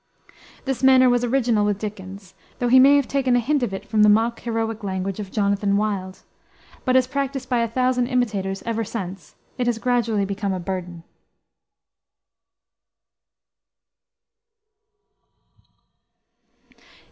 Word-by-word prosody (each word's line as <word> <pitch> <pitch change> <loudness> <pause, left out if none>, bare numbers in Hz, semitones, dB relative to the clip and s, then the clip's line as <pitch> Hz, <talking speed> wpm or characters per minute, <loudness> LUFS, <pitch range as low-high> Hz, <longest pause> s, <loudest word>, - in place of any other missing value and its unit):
This 270 -2 -3
manner 260 -1 +6
was 245 0 +1
original 240 -3 +1
with 205 -1 0
Dickens, 195 -2 -8 0.2
though 245 - -1
he 260 +2 +7
may 275 +2 +7
have 285 -2 +2
taken 265 -3 +1
a - - +4
hint 280 +4 0
of 240 -5 -1
it 195 - -6
from 215 -1 +1
the 210 - +6
mock 225 +2 +2
heroic 225 -2 -3
language 190 0 -3
of 200 -2 -6
Jonathan 200 -1 +1
Wild; 195 -3 -3 0.6
but 255 - +2
as 260 -1 +5
practiced 270 -1 -4
by 245 -2 +1
a 230 - +1
thousand 250 +1 0
imitators, 205 -7 -2
ever 225 -1 -2
since, 195 -4 -7 0.2
it 245 - 0
has 240 -2 0
gradually 230 -4 0
become 200 0 -3
a 185 - -3
burden. 175 -2 -6
225 Hz, 135 wpm, -22 LUFS, 200-250 Hz, 0.6 s, he